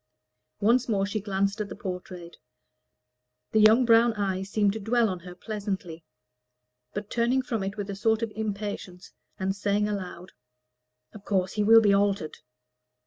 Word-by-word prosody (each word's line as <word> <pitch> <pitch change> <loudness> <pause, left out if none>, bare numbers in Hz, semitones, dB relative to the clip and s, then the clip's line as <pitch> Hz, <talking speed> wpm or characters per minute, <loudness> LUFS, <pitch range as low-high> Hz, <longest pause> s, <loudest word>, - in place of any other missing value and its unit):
Once 235 +4 +3
more 195 -3 +1
she 205 +1 -3
glanced 200 +1 -1
at 205 - -4
the 195 - -7
portrait. 180 -2 -7 1.1
The 220 - +3
young 220 +4 +6
brown 230 0 +5
eyes 195 -2 -2
seemed 205 -1 +2
to 220 - -5
dwell 225 +2 +2
on 185 -2 -4
her 180 +1 -11
pleasantly; 195 -5 -5 0.9
but, 205 0 -6
turning 245 +3 +1
from 230 -4 -2
it 195 +2 -4
with 205 -1 -4
a 200 - -5
sort 220 +3 +1
of 225 - -2
impatience, 205 -4 -5 0.2
and 190 0 -1
saying 205 +1 0
aloud, 185 -3 -6 0.8
"Of 215 - -12
course 190 -2 0
he 210 - 0
will 225 +2 +7
be 205 -2 +4
altered!" 200 -5 0
205 Hz, 160 wpm, -27 LUFS, 190-220 Hz, 1.1 s, will